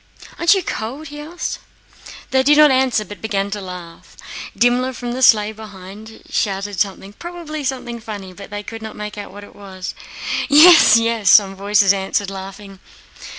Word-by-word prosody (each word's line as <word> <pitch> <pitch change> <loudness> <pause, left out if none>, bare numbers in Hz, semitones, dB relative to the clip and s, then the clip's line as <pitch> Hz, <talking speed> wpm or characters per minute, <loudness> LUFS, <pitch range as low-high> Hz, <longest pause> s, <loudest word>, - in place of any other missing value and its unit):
"Aren't 340 +4 +5
you 385 - -1
cold?" 275 +4 -5
he 295 0 -9
asked. 335 +4 -5 0.7
They 265 0 +3
did 295 +3 +4
not 300 -1 +7
answer 255 -5 +1
but 205 - -11
began 200 -2 -2
to 205 0 -4
laugh. 180 -3 -11 0.4
Dimmler 245 +2 +2
from 245 -1 -6
the 255 +2 -4
sleigh 215 -4 +5
behind 215 0 -12
shouted 195 -1 -2
something—probably 305 - -5
something 250 -3 -4
funny—but 200 -4 -9
they 205 0 -6
could 225 +1 -9
not 220 -1 -8
make 210 0 -7
out 205 - -8
what 205 +1 -11
he - - -14
said. 190 -2 -8 0.6
"Yes, 300 -5 +8
yes!" 230 -3 0
some 195 -1 +5
voices 200 0 +3
answered, 195 0 -2
laughing. 195 0 -10
215 Hz, 160 wpm, -19 LUFS, 195-260 Hz, 0.7 s, Yes